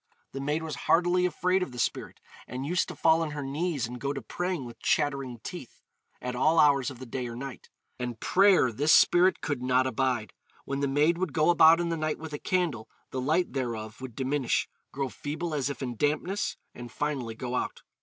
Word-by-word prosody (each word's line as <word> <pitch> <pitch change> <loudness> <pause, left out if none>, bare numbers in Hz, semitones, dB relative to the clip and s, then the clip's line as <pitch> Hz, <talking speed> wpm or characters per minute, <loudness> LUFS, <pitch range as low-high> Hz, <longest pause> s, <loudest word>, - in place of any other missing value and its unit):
The 135 - -5
maid 150 +3 -1
was 160 -1 -4 0.2
heartily 180 +1 +4
afraid 180 +1 +1
of 180 - -3
the - - -9
spirit, 120 - -2 0.3
and 130 +2 -5
used 175 +5 +1
to - - -7
fall 160 0 +4
on 160 - -1
her 145 -1 -4
knees 145 0 -1
and 125 +1 -8
go 140 0 -1
to 135 - -5
praying 175 +3 -3
with 120 - -10
chattering 135 -4 0
teeth, 155 -9 -9 0.4
at 125 0 -4
all 155 +6 +3
hours 140 -3 +4
of 130 - -9
the 130 - -9
day 125 +1 -4
or 120 - -7
night; 135 0 -8 0.3
and 120 -2 -4
prayer 190 - +4
this 145 +7 +1
spirit 180 +2 +5
could 145 -5 -2
not 130 +1 +2
abide. 130 -4 -1 0.3
When 140 0 -3
the 140 - +1
maid 150 +5 +2
would 185 -6 -2
go 155 +3 +4
about 165 0 +7
in 170 -1 -1
the 165 - -1
night 155 -1 -1
with 160 -1 -8
a 145 - -4
candle, 165 -12 -1 0.2
the 130 - -2
light 160 +7 +1
thereof 115 -4 -4
would 130 -4 -7
diminish, 135 0 0 0.2
grow 135 0 -2
feeble 155 +5 -4
as 140 -2 0
if 140 - -5
in 120 -3 -4
dampness, 155 - -1 0.2
and 120 -1 -9
finally 130 -6 -3
go 125 +2 -5
out. - - -3
140 Hz, 215 wpm, -28 LUFS, 125-165 Hz, 0.4 s, about